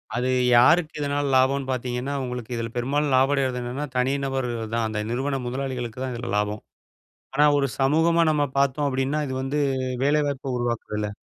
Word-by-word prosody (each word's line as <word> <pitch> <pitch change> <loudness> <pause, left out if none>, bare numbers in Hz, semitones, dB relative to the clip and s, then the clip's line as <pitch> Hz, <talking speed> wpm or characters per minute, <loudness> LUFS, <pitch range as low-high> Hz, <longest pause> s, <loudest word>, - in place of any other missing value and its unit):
அது 125 +2 0 0.3
யாருக்கு 155 +5 +4
இதனால 145 0 -1
லாபம்ன்னு 130 +1 +2
பார்த்தீங்கன்னா, 125 +2 -3
உங்களுக்கு 125 -1 -5
இதில 115 0 -3
பெரும்பாலும் 140 +3 0
லாபம் 135 +2 +4
அடைறது 130 -2 0
என்னன்னா, 125 +5 -4
தனி 125 +2 +2
நபரு 135 -2 -2 0.3
தான். 115 -1 +1
அந்த 110 -1 -3
நிறுவன 135 +2 -1
முதலாளிகளுக்கு 125 -2 -4
தான் 130 -1 -3
இதில 120 +1 -5
லாபம். 105 +1 -1 0.7
ஆனா, 145 +2 +5
ஒரு 140 -1 +1
சமூகமா 160 +5 +3
நம்ம 150 -1 +2
பார்த்தோம் 140 +1 +2
அப்படின்னா, 135 +3 -1
இது 130 - -3
வந்து 140 +3 -1 0.4
வேலை 150 +1 +3
வாய்ப்பை 135 -1 -4
உருவாக்குதுல்ல. 110 -3 -2
130 Hz, 165 wpm, -24 LUFS, 125-145 Hz, 0.7 s, ஆனா